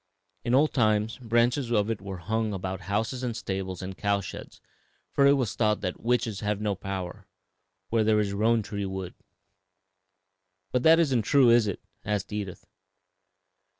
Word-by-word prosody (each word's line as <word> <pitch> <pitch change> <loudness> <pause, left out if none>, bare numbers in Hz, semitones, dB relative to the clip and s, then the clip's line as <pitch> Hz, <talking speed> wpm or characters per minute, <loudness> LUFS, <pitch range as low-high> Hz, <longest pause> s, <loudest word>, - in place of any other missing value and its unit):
In 120 +1 +2
old 150 +3 +3
times 110 -2 +1
branches 120 +2 +1
of 105 -1 +2
it 110 - -4
were 95 -1 -6
hung 110 +4 -1
about 95 0 -4
houses 110 +5 -1
and 120 -3 -3
stables 95 -4 -4
and 95 +1 -6
cow 100 0 +1
sheds, 100 - -9 0.5
for 140 - +4
it 140 - +7
was 130 -6 0
thought 105 -2 +1
that 90 - -3
"'witches 115 -3 0
have 105 -1 -1
no 105 -1 0
power 95 -2 -6 0.6
Where 115 -1 +2
there 110 0 +3
is 100 -2 0
roan 110 +2 +2
tree 100 -1 -4
wood.'" 95 -2 -5 1.6
"But 125 - +1
that 160 +4 +7
isn't 135 -8 +3
true, 130 +2 +5
is 115 -2 +5
it?" 100 - -3 0.2
asked 105 0 -2
Edith. 100 -4 -5
105 Hz, 165 wpm, -27 LUFS, 100-120 Hz, 1.6 s, it